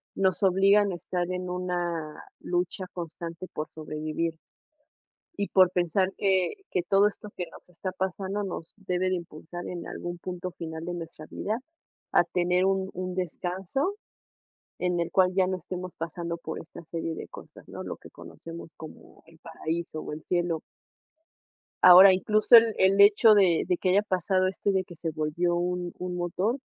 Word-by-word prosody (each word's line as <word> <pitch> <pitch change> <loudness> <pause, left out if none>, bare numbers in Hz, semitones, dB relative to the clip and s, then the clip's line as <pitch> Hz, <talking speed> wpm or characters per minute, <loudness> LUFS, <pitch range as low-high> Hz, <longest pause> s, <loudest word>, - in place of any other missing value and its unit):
nos 190 0 +1
obligan 195 +2 +4
a 180 - -3
estar 175 0 -3
en 180 0 -3
una 175 -3 -3 0.2
lucha 180 +2 -2
constante 170 +1 -6
por 155 - -4
sobrevivir. 155 +1 -3 1.0
Y 200 - -1
por 185 -2 +5
pensar 185 +2 +1
que 190 -2 +2 0.2
que 180 - 0
todo 195 +3 +4
esto 210 0 -10
que 180 - -2
nos - - -15
está 185 +2 -5
pasando 190 +2 -2
nos 170 -3 -6
debe 185 -2 -1
de 185 - +1
impulsar 170 +1 -8
en 175 -1 -6
algún 175 0 -6
punto 180 0 -5
final 160 -1 -6
de 175 0 -4
nuestra 165 -2 -8
vida, 220 +9 -3 0.5
a - - +6
tener 180 +1 +1
un 190 0 0
un 185 0 -4
descanso, 185 - -2 0.8
en 180 -1 0
el 170 0 -1
cual 185 -1 +4
ya 190 -1 +4
no 185 0 -1
estemos 185 0 -7
pasando 170 +1 -4
por 160 -1 -6
esta 170 +1 -11
serie 165 0 -4
de - - -7
cosas, - - -13
¿no?, - - -8
lo - - -6
que - - -14
conocemos 165 0 -10
como 160 - -12
el 165 -1 -19
paraíso, 165 0 -4
o - - -6
el 155 +1 -8
cielo. 175 -3 0 1.2
Ahora 185 +2 +10
incluso 215 +5 +5
el 230 -1 +6
el 195 +1 +4
hecho 210 +2 +7
de 185 -5 +4
de 180 - +2
que 185 - 0
haya 200 +3 +4
pasado 185 -1 +1
esto 195 +1 -1
y - - +2
de 190 -1 +1
que 175 - -12
se 165 0 -3
volvió 155 +3 0
un 175 0 -2
un 180 0 -4
motor, 185 +8 -1
180 Hz, 175 wpm, -27 LUFS, 170-190 Hz, 1.2 s, Ahora